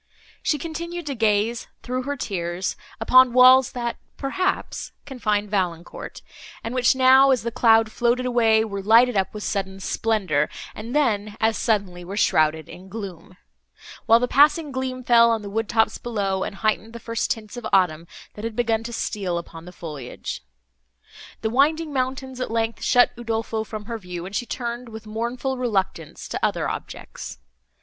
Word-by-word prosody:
She 300 Hz, -, +1 dB
continued 340 Hz, +3 st, -5 dB
to 285 Hz, -, -3 dB
gaze, 220 Hz, 0 st, +1 dB, 0.2 s
through 255 Hz, +1 st, -2 dB
her 285 Hz, 0 st, -3 dB
tears, 180 Hz, -4 st, -3 dB, 0.2 s
upon 255 Hz, +2 st, +6 dB
walls 255 Hz, +1 st, +7 dB
that, 240 Hz, -1 st, -3 dB, 0.2 s
perhaps, 365 Hz, +7 st, -2 dB
confined 210 Hz, -6 st, -1 dB
Valancourt, 175 Hz, -4 st, -3 dB, 0.4 s
and 230 Hz, -, -4 dB
which 255 Hz, 0 st, +3 dB
now, 265 Hz, +1 st, +6 dB
as 260 Hz, -4 st, +2 dB
the 235 Hz, -, -2 dB
cloud 225 Hz, -2 st, +4 dB
floated 240 Hz, +2 st, +1 dB
away, 225 Hz, -3 st, +3 dB
were 200 Hz, -2 st, -4 dB
lighted 230 Hz, +4 st, +5 dB
up 190 Hz, -1 st, +1 dB
with 210 Hz, -1 st, -7 dB
sudden 195 Hz, -2 st, -3 dB
splendour, 190 Hz, -7 st, 0 dB, 0.2 s
and 230 Hz, +5 st, -7 dB
then, 215 Hz, -7 st, +1 dB
as 220 Hz, 0 st, +2 dB
suddenly 195 Hz, -6 st, -1 dB
were 195 Hz, +3 st, -6 dB
shrouded 155 Hz, -5 st, +2 dB
in 185 Hz, +2 st, -12 dB
gloom; 190 Hz, -4 st, -8 dB, 0.7 s
while 230 Hz, -, +7 dB
the 250 Hz, -, 0 dB
passing 295 Hz, +3 st, +4 dB
gleam 260 Hz, -1 st, -3 dB
fell 235 Hz, -1 st, +6 dB
on 225 Hz, -2 st, 0 dB
the 200 Hz, -, -7 dB
wood 225 Hz, +1 st, -2 dB
tops 225 Hz, -1 st, +2 dB
below, 200 Hz, -5 st, -2 dB
and -, -, -5 dB
heightened 215 Hz, +2 st, -1 dB
the 235 Hz, -, -7 dB
first 230 Hz, 0 st, -2 dB
tints 215 Hz, 0 st, -4 dB
of 240 Hz, -2 st, -5 dB
autumn, 170 Hz, -3 st, +2 dB, 0.3 s
that 210 Hz, -, -9 dB
had 225 Hz, -1 st, -4 dB
begun 225 Hz, -2 st, +1 dB
to 235 Hz, -, -5 dB
steal 195 Hz, -6 st, -2 dB
upon 165 Hz, -1 st, -8 dB
the 180 Hz, -, -10 dB
foliage. 150 Hz, -8 st, -7 dB, 1.0 s
The 220 Hz, -, -1 dB
winding 300 Hz, +4 st, +2 dB
mountains, 260 Hz, 0 st, -3 dB
at -, -, -2 dB
length, 225 Hz, 0 st, -1 dB
shut 245 Hz, -1 st, +4 dB
Udolpho 225 Hz, -1 st, -2 dB
from 215 Hz, 0 st, -7 dB
her 230 Hz, 0 st, -5 dB
view, 180 Hz, -3 st, -7 dB
and 195 Hz, +2 st, -7 dB
she 240 Hz, -, -2 dB
turned, 240 Hz, 0 st, -4 dB
with 220 Hz, 0 st, -9 dB
mournful 240 Hz, +4 st, -3 dB
reluctance, 195 Hz, -, -2 dB
to -, -, -4 dB
other -, -, +1 dB
objects. -, -, -7 dB
225 Hz, 170 wpm, -23 LUFS, 200-250 Hz, 1.0 s, walls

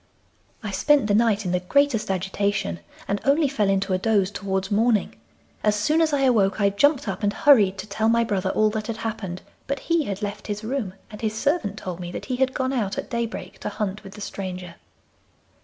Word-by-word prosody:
'I 210 Hz, -, -3 dB
spent 290 Hz, +5 st, +3 dB
the 205 Hz, -, +1 dB
night 215 Hz, -2 st, +3 dB
in 180 Hz, -, -1 dB
the 180 Hz, -, +1 dB
greatest 225 Hz, +2 st, +1 dB
agitation, 190 Hz, -, -1 dB, 0.3 s
and 200 Hz, +1 st, -1 dB
only 285 Hz, +2 st, +3 dB
fell 215 Hz, -7 st, 0 dB
into 195 Hz, 0 st, +1 dB
a 185 Hz, -, +1 dB
doze 200 Hz, -2 st, +2 dB
towards 190 Hz, -1 st, -2 dB
morning. 215 Hz, 0 st, +2 dB, 0.5 s
As 210 Hz, 0 st, +3 dB
soon 300 Hz, +11 st, +2 dB
as 320 Hz, -1 st, +3 dB
I 285 Hz, -2 st, +1 dB
awoke 220 Hz, -7 st, +3 dB
I 200 Hz, -1 st, +3 dB
jumped 280 Hz, +7 st, +2 dB
up, -, -, -3 dB
and 205 Hz, -1 st, +2 dB
hurried 210 Hz, -7 st, +5 dB
to 190 Hz, -, -5 dB
tell 220 Hz, +2 st, 0 dB
my 235 Hz, 0 st, +4 dB
brother 200 Hz, -4 st, -1 dB
all 215 Hz, +2 st, +2 dB
that 215 Hz, -1 st, -3 dB
had 230 Hz, -2 st, -3 dB
happened, 210 Hz, -5 st, -5 dB, 0.2 s
but 280 Hz, +1 st, -1 dB
he 335 Hz, -3 st, +1 dB
had 200 Hz, -1 st, -4 dB
left 205 Hz, 0 st, -5 dB
his 210 Hz, 0 st, -4 dB
room, 220 Hz, -5 st, -3 dB, 0.2 s
and 210 Hz, -, -9 dB
his 215 Hz, -1 st, -1 dB
servant 225 Hz, -, 0 dB
told 180 Hz, -2 st, -6 dB
me 175 Hz, -1 st, -6 dB
that -, -, -5 dB
he 255 Hz, -1 st, -2 dB
had 260 Hz, 0 st, +1 dB
gone 260 Hz, 0 st, 0 dB
out 210 Hz, -6 st, -1 dB
at -, -, -5 dB
daybreak 235 Hz, -1 st, -4 dB
to -, -, -3 dB
hunt 205 Hz, 0 st, -3 dB
with 195 Hz, -1 st, -11 dB
the 210 Hz, -, -10 dB
stranger. 185 Hz, -3 st, -6 dB
210 Hz, 220 wpm, -24 LUFS, 195-240 Hz, 0.5 s, hurried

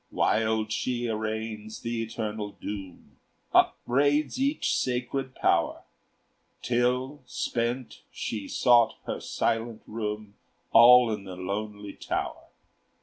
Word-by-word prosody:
Wild 110 Hz, 0 st, +1 dB
she 120 Hz, +2 st, -1 dB
arraigns 110 Hz, -1 st, -4 dB
the 115 Hz, 0 st, -2 dB
eternal 110 Hz, -2 st, -4 dB
doom, 95 Hz, -2 st, -8 dB, 0.3 s
Upbraids 145 Hz, -, +2 dB
each 280 Hz, +3 st, +1 dB
sacred 130 Hz, +1 st, -2 dB
Power, -, -, +1 dB, 0.8 s
Till, 125 Hz, +3 st, 0 dB
spent, 120 Hz, +1 st, -2 dB
she 105 Hz, -3 st, -4 dB
sought 120 Hz, -2 st, +4 dB
her -, -, -3 dB
silent 115 Hz, 0 st, -1 dB
room, 105 Hz, -1 st, -4 dB, 0.4 s
All 120 Hz, 0 st, +8 dB
in 105 Hz, -2 st, -5 dB
the 95 Hz, -1 st, -7 dB
lonely 105 Hz, +2 st, -5 dB
tower. -, -, -4 dB
115 Hz, 100 wpm, -27 LUFS, 105-125 Hz, 0.8 s, All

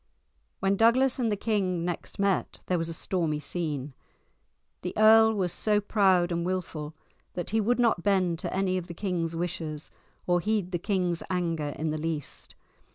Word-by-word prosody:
When 195 Hz, +1 st, +2 dB
Douglas 255 Hz, +4 st, +4 dB
and 230 Hz, -3 st, +1 dB
the 205 Hz, -, 0 dB
king 190 Hz, -5 st, 0 dB
next 175 Hz, -2 st, -5 dB
met 200 Hz, -2 st, 0 dB
there 180 Hz, -2 st, 0 dB
was 165 Hz, 0 st, -2 dB
a -, -, -3 dB
stormy 160 Hz, -3 st, -1 dB
scene. 150 Hz, -3 st, -3 dB, 0.9 s
The 180 Hz, -, -5 dB
earl 220 Hz, +1 st, +7 dB
was 185 Hz, -4 st, 0 dB
so 210 Hz, -1 st, +2 dB
proud 190 Hz, -4 st, +3 dB
and 170 Hz, 0 st, -1 dB
wilful 165 Hz, -4 st, -3 dB, 0.4 s
that 175 Hz, -, -4 dB
he 220 Hz, 0 st, +2 dB
would 240 Hz, +4 st, +2 dB
not 230 Hz, -7 st, +2 dB
bend 185 Hz, -4 st, +1 dB
to -, -, -4 dB
any 185 Hz, -1 st, 0 dB
of 175 Hz, -, -9 dB
the 170 Hz, -, -8 dB
king's 170 Hz, -4 st, -2 dB
wishes 160 Hz, -3 st, -3 dB, 0.3 s
or 175 Hz, 0 st, +3 dB
heed 205 Hz, -1 st, -1 dB
the 175 Hz, -, -1 dB
king's 180 Hz, -3 st, 0 dB
anger 165 Hz, -5 st, -1 dB
in 155 Hz, 0 st, -1 dB
the 155 Hz, -, -3 dB
least. 160 Hz, -3 st, -4 dB
180 Hz, 175 wpm, -28 LUFS, 165-205 Hz, 0.9 s, earl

